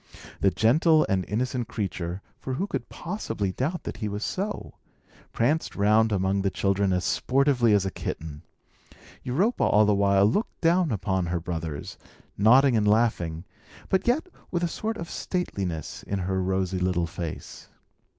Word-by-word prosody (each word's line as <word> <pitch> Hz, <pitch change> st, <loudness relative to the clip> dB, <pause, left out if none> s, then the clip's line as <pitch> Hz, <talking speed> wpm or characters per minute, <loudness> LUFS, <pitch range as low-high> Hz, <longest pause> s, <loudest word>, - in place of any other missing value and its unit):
The 100 Hz, -, +4 dB
gentle 155 Hz, -, +4 dB
and 95 Hz, -1 st, +1 dB
innocent 120 Hz, +3 st, -1 dB
creature 90 Hz, -2 st, -4 dB, 0.2 s
(for 130 Hz, -, -4 dB
who 190 Hz, -, -1 dB
could -, -, -4 dB
possibly 165 Hz, -, -3 dB
doubt 150 Hz, -, -2 dB
that -, -, -6 dB
he 105 Hz, -3 st, -3 dB
was 105 Hz, +1 st, -3 dB
so?) 205 Hz, +3 st, -4 dB, 0.6 s
pranced 150 Hz, +8 st, 0 dB
round 110 Hz, +2 st, +3 dB
among 95 Hz, 0 st, +1 dB
the 95 Hz, -, +1 dB
children 100 Hz, 0 st, +1 dB
as 90 Hz, -1 st, 0 dB
sportively 125 Hz, +5 st, +2 dB
as 100 Hz, -2 st, +3 dB
a 95 Hz, -, -2 dB
kitten. 75 Hz, -2 st, -6 dB, 0.8 s
Europa 185 Hz, -, +1 dB
all 105 Hz, +1 st, +5 dB
the 105 Hz, -, +3 dB
while 100 Hz, 0 st, +4 dB
looked 125 Hz, -, 0 dB
down 170 Hz, -2 st, +3 dB
upon 95 Hz, -3 st, -1 dB
her 85 Hz, 0 st, -1 dB
brothers, 80 Hz, -3 st, -5 dB, 0.4 s
nodding 125 Hz, +5 st, +5 dB
and 105 Hz, -2 st, +2 dB
laughing, 105 Hz, -7 st, +1 dB, 0.5 s
but 190 Hz, -, +1 dB
yet 260 Hz, +9 st, +2 dB, 0.2 s
with 175 Hz, -1 st, -1 dB
a -, -, +2 dB
sort 220 Hz, +6 st, -3 dB
of 170 Hz, -, -6 dB
stateliness 95 Hz, -, -3 dB
in 100 Hz, -, -3 dB
her 95 Hz, 0 st, -1 dB
rosy 95 Hz, 0 st, -1 dB
little 90 Hz, -1 st, +1 dB
face. 85 Hz, -1 st, -7 dB
105 Hz, 160 wpm, -26 LUFS, 95-135 Hz, 0.8 s, all